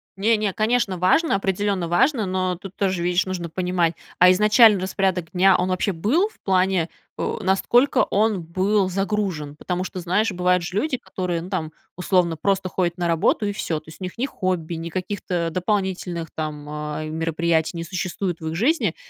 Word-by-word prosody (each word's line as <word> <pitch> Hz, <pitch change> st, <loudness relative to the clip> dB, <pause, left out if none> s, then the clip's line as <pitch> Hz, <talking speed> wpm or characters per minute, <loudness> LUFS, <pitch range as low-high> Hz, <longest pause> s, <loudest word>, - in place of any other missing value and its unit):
Не-не, 210 Hz, +1 st, +1 dB
конечно, 215 Hz, -3 st, +1 dB
важно, 195 Hz, -, +3 dB
определенно 195 Hz, -2 st, -1 dB
важно, 220 Hz, -, +2 dB
но 185 Hz, -1 st, -1 dB
тут 190 Hz, +2 st, -11 dB
тоже, 185 Hz, -3 st, 0 dB
видишь, 175 Hz, +1 st, +1 dB
нужно 175 Hz, -3 st, -4 dB
понимать, 180 Hz, -1 st, 0 dB, 0.2 s
а 180 Hz, +1 st, +7 dB
изначально 210 Hz, +2 st, +6 dB
распорядок 185 Hz, -2 st, -1 dB
дня, 190 Hz, 0 st, +5 dB
он 180 Hz, +1 st, 0 dB
вообще 185 Hz, +2 st, 0 dB
был 225 Hz, -, +1 dB
в -, -, -26 dB
плане, 185 Hz, -3 st, +2 dB, 0.3 s
э, -, -, -1 dB
насколько 240 Hz, +8 st, +3 dB
он 210 Hz, -2 st, +1 dB
был 190 Hz, +4 st, +1 dB
загружен? 190 Hz, -6 st, -2 dB
Потому 180 Hz, +4 st, -3 dB
что, 185 Hz, 0 st, -6 dB
знаешь, 185 Hz, +6 st, +1 dB
бывают 180 Hz, 0 st, +1 dB
же 175 Hz, -, -6 dB
люди, 260 Hz, +5 st, 0 dB
которые, 180 Hz, -7 st, -3 dB
ну, 180 Hz, -, -8 dB
там, 160 Hz, -5 st, -2 dB, 0.2 s
условно, 180 Hz, -2 st, +1 dB
просто 195 Hz, +2 st, 0 dB
ходят 180 Hz, -1 st, -1 dB
на 175 Hz, -1 st, -1 dB
работу 170 Hz, +5 st, +2 dB
и 205 Hz, -, -1 dB
всё. 165 Hz, -6 st, -2 dB
То 155 Hz, -, -17 dB
есть 160 Hz, -, -14 dB
у -, -, -4 dB
них 180 Hz, -, -8 dB
ни 245 Hz, -, 0 dB
хобби, 185 Hz, -, -2 dB
ни 165 Hz, +1 st, -5 dB
каких-то 180 Hz, -1 st, -3 dB
дополнительных 185 Hz, -3 st, -2 dB
там, 150 Hz, -2 st, -5 dB
а, 150 Hz, 0 st, -4 dB
мероприятий 165 Hz, +1 st, 0 dB
не 165 Hz, -, -3 dB
существует 180 Hz, +1 st, -3 dB
в 160 Hz, -, -6 dB
их 160 Hz, -, -3 dB
жизни. 275 Hz, -, +1 dB
185 Hz, 180 wpm, -23 LUFS, 170-200 Hz, 0.3 s, а